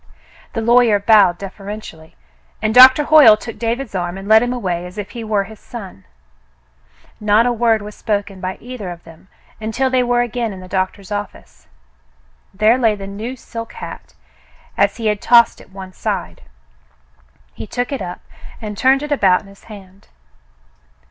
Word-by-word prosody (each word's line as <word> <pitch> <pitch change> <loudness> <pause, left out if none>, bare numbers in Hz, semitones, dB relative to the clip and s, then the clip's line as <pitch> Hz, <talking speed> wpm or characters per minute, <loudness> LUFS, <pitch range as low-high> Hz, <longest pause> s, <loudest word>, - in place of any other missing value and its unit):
The 225 - -2
lawyer 235 -2 +4
bowed 200 -4 +4
deferentially, 195 -4 -9 0.4
and 215 - -1
Doctor 260 +4 +8
Hoyle 290 -8 +7
took 230 0 -9
David's 235 +1 -3
arm 175 -1 -3
and 195 +1 -9
led 220 +1 +6
him 245 0 -1
away 180 -8 -3
as 180 +3 -14
if 205 -1 -6
he 235 -2 -7
were 215 -2 0
his 220 +2 -13
son. 195 - -10 1.1
Not 210 +2 +3
a 245 - +2
word 225 -2 +1
was 210 0 -9
spoken 200 -3 -3
by 185 0 -4
either 240 -5 -8
of 175 -1 -9
them 165 +2 -17 0.3
until 230 +4 -1
they 255 -1 +2
were 245 0 +1
again 240 -2 -3
in 190 - -10
the 185 - -11
doctor's 190 +1 -3
office. 205 0 -7 0.8
There 215 +5 +2
lay 225 -4 +2
the 200 -1 -8
new 215 +6 -6
silk 230 -2 -9
hat, - - -10 0.6
as 200 +1 +1
he 230 - -6
had 210 -1 0
tossed 235 -1 +4
it - - -18
one 190 -1 -10
side. - - -4 1.1
He - - -9
took 245 +3 -3
it 275 - -3
up 175 0 -7 0.4
and 210 -2 -6
turned 265 +6 +2
it 295 - -6
about 190 -10 +3
in - - -18
his 195 - -19
hand. 195 -3 -14
215 Hz, 175 wpm, -18 LUFS, 195-240 Hz, 1.1 s, Doctor